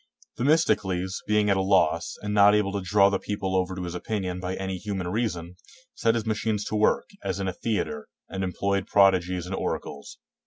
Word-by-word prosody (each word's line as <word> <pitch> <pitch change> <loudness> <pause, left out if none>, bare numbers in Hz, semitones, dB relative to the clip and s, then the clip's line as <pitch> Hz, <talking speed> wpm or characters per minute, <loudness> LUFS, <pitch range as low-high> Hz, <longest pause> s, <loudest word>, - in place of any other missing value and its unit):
] - - -30
Themistocles, 95 - +1
being 105 -1 +3
at 100 - +3
a - - +2
loss, 95 -3 +2
and 105 0 -2
not 105 0 +6
able 105 -2 +1
to 100 0 -2
draw 100 +2 +4
the 100 - 0
people 100 -2 -3
over 95 0 0
to 90 - -5
his 85 -1 -5
opinion 90 -1 -3
by 90 0 -3
any 95 -1 -4
human 95 -3 -3
reason, 90 -5 -3 0.4
set 115 - +1
his 115 - -2
machines 110 -1 -1
to - - -3
work, 105 0 +2
as - - -2
in 95 - -2
a 95 - -2
theater, 90 -9 -3 0.2
and 95 0 -4
employed 100 +1 -1
prodigies 90 -3 +3
and 90 - -6
oracles. 70 -6 -4
95 Hz, 200 wpm, -26 LUFS, 90-105 Hz, 0.4 s, not